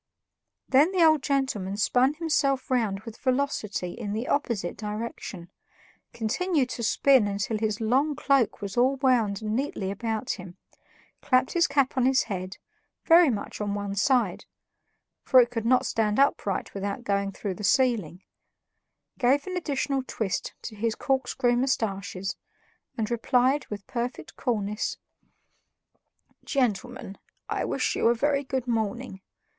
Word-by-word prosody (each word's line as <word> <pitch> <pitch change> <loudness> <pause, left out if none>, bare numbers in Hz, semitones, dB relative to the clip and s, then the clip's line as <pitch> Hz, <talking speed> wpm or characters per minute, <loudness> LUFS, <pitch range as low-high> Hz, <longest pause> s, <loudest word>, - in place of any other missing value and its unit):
Then 285 +7 +4
the 350 -3 +5
old 310 -3 +5
gentleman 260 -9 -1
spun 255 +6 +2
himself 285 -5 0
round 220 -6 +1
with 220 0 -10
velocity 255 -9 -1
in 210 -2 -5
the 225 +4 -3
opposite 230 -11 -1
direction, 210 -4 -6 0.6
continued 270 - 0
to 240 - -5
spin 250 0 +4
until 205 +2 -2
his 215 0 -1
long 265 +7 +1
cloak 275 -6 +1
was 200 -1 -5
all 255 +3 +3
wound 235 -7 +1
neatly 215 -3 -2
about 225 +3 -3
him, 185 -2 -8 0.6
clapped 255 0 +2
his 345 -1 +3
cap 275 -2 +1
on 255 0 +3
his 265 0 +3
head, 185 -1 -5 0.5
very 335 -1 +7
much 215 -2 -4
on 205 -1 -1
one 200 -1 -3
side 245 +5 +1 0.8
(for 260 - +5
it 240 -1 +4
could 230 -2 -2
not 255 +1 +4
stand 215 -2 0
upright 270 -8 +1
without 200 +3 -4
going 200 -2 0
through 195 0 -4
the 210 - -9
ceiling), 210 - +1 1.0
gave 275 +3 +3
an 370 - -5
additional 280 -5 -1
twist 200 -4 -3
to 220 - -7
his 220 +1 -1
corkscrew 260 -3 0
mustaches, 200 -7 -1 0.6
and 220 0 -2
replied 250 +4 +2
with 205 -2 -7
perfect 245 0 -5
coolness: 210 -3 -2 1.5
"Gentlemen, 245 -5 -2 0.3
I - - -2
wish - - -1
you - - +2
a 235 - +4
very 285 +3 +1
good 260 -2 -3
morning. 225 -2 -2
235 Hz, 140 wpm, -26 LUFS, 205-265 Hz, 1.5 s, very